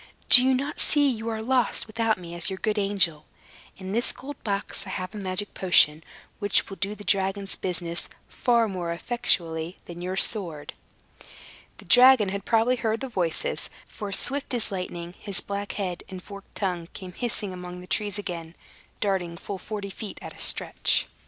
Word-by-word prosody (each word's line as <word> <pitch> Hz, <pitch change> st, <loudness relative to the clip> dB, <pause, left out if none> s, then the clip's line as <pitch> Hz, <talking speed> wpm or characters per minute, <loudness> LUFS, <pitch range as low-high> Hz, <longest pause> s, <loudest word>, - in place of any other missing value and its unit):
"Do 250 Hz, -, +11 dB
not 280 Hz, +3 st, -3 dB
you -, -, -7 dB
see 290 Hz, -2 st, +4 dB
you 225 Hz, -1 st, -4 dB
are 220 Hz, -1 st, -3 dB
lost, 255 Hz, +1 st, +1 dB
without 225 Hz, 0 st, 0 dB
me 170 Hz, -2 st, -9 dB
as 175 Hz, +2 st, +1 dB
your 190 Hz, -, -4 dB
good 215 Hz, +2 st, 0 dB
angel? 185 Hz, -7 st, +1 dB, 0.5 s
In 190 Hz, -1 st, -6 dB
this 235 Hz, +4 st, +1 dB
gold 280 Hz, +1 st, -10 dB
box 200 Hz, -1 st, -3 dB
I -, -, -6 dB
have 185 Hz, 0 st, -4 dB
a -, -, -7 dB
magic 195 Hz, +1 st, -3 dB
potion, 160 Hz, -4 st, +4 dB, 0.4 s
which 205 Hz, -1 st, +2 dB
will 195 Hz, -, -8 dB
do 200 Hz, +2 st, -2 dB
the 205 Hz, -, -11 dB
dragon's 195 Hz, 0 st, 0 dB
business 175 Hz, -2 st, -2 dB, 0.2 s
far 235 Hz, -2 st, +2 dB
more 180 Hz, -4 st, -3 dB
effectually 170 Hz, -5 st, -1 dB
than 175 Hz, 0 st, -9 dB
your 185 Hz, +1 st, -3 dB
sword." 175 Hz, -9 st, +3 dB, 1.0 s
The -, -, -13 dB
dragon 250 Hz, -4 st, +7 dB
had 200 Hz, 0 st, -4 dB
probably 235 Hz, +2 st, +3 dB
heard 225 Hz, -1 st, 0 dB
the 265 Hz, -, -5 dB
voices; 175 Hz, -8 st, -1 dB, 0.2 s
for 205 Hz, -2 st, -7 dB
swift 270 Hz, +6 st, +1 dB
as 225 Hz, -2 st, 0 dB
lightning, 175 Hz, -2 st, -5 dB
his 200 Hz, -3 st, 0 dB
black 200 Hz, 0 st, -4 dB
head 185 Hz, -4 st, -3 dB
and 190 Hz, -1 st, -7 dB
forked 200 Hz, +1 st, -12 dB
tongue 180 Hz, -4 st, -2 dB
came 185 Hz, -2 st, -9 dB
hissing 210 Hz, -3 st, -3 dB
among 180 Hz, 0 st, -7 dB
the 180 Hz, -, -10 dB
trees 205 Hz, +1 st, -1 dB
again, 170 Hz, -5 st, -6 dB, 0.5 s
darting 185 Hz, -4 st, 0 dB
full 195 Hz, +3 st, -6 dB
forty 205 Hz, -1 st, -5 dB
feet 210 Hz, +2 st, -7 dB
at -, -, -8 dB
a -, -, -15 dB
stretch. -, -, +2 dB
195 Hz, 180 wpm, -26 LUFS, 180-220 Hz, 1.0 s, Do